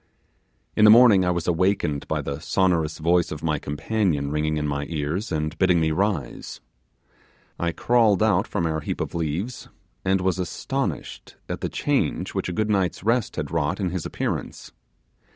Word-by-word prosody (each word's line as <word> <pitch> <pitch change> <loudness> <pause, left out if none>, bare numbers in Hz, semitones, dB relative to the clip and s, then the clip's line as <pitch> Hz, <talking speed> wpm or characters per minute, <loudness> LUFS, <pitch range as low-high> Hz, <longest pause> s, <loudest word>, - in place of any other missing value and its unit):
In - - +3
the 105 - +9
morning 110 -4 +7
I 90 - +1
was 85 -2 -1
awakened 85 -4 0
by - - -1
the 70 0 -4
sonorous 85 -3 +1
voice 85 +2 +2
of 75 - -6
my 75 -3 0
companion 75 -1 -1
ringing 75 0 0
in 75 0 -1
my 70 0 -2
ears 80 +7 -3
and 75 0 -2
bidding 90 -2 +4
me 80 -1 +1
rise. 95 -2 -2 1.0
I 85 0 0
crawled 115 -2 +3
out - - +2
from 85 - -2
our 80 -1 -1
heap 80 - -4
of - - -3
leaves, 85 +9 -3 0.4
and 95 0 +2
was 95 0 0
astonished 90 -3 -4
at - - -5
the - - -2
change - - -1
which - - -2
a - - -2
good 105 +4 -1
night's 90 -4 0
rest 115 +1 +1
had - - -4
wrought 75 0 -1
in 95 -3 -1
his 90 -3 -3
appearance. - - -4
85 Hz, 175 wpm, -24 LUFS, 75-95 Hz, 1.0 s, the